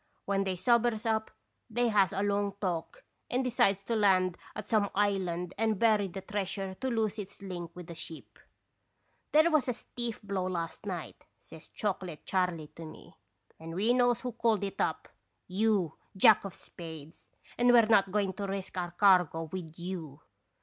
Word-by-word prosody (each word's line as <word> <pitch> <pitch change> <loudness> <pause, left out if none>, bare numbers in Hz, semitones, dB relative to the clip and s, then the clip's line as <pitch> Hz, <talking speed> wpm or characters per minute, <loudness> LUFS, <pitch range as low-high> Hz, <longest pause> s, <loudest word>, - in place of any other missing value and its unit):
When 195 0 +1
they 190 -1 -1
sobers 235 +2 +2
up, 220 -1 0 0.4
they 240 +1 +1
has 200 -4 +4
a 200 0 -1
long 200 -1 0
talk 185 - -3 0.3
and 255 +2 +1
decides 200 -5 +2
to 230 +3 -1
land 185 -4 +3 0.2
at - - -6
some 210 -3 +2
island 185 -4 0
and 220 -2 +2
bury 215 -2 +3
the 190 +1 -7
treasure 195 -1 -3
to 265 - -1
lose 220 -3 0
its 200 -2 -7
link 175 -3 -5
with 180 -1 -8
the 170 - -8
ship. 160 0 -9 0.3
" - - -48
* - - -43
There 315 +3 +5
was 305 -4 +3
a 250 - 0
stiff 240 -1 -4
blow 195 -2 -2
last 170 +2 -4
night,' 180 -5 -6 0.2
says 160 -1 -13
Chocolate 185 -6 -4
Charley 180 -5 0
to 165 - -11
me, 155 - -11 0.2
* 100 0 -36
and 165 +1 -7
we 215 +6 +3
knows 245 -1 +3
who 250 - -3
called 225 -3 +1
it 195 - -3
up, - - -1 0.4
you 195 -2 +1 0.2
Jack 210 0 +6
of 195 - -6
Spades, 160 -2 -10 0.3
and 245 0 +4
we're 235 -2 +7
not 200 -3 +4
going 200 -2 +1
to 200 +1 -4
risk 195 -1 -4
our 175 -1 -2
cargo 180 -3 +4
with 170 -4 -6
you. 170 -5 -6
195 Hz, 185 wpm, -30 LUFS, 180-220 Hz, 0.4 s, we're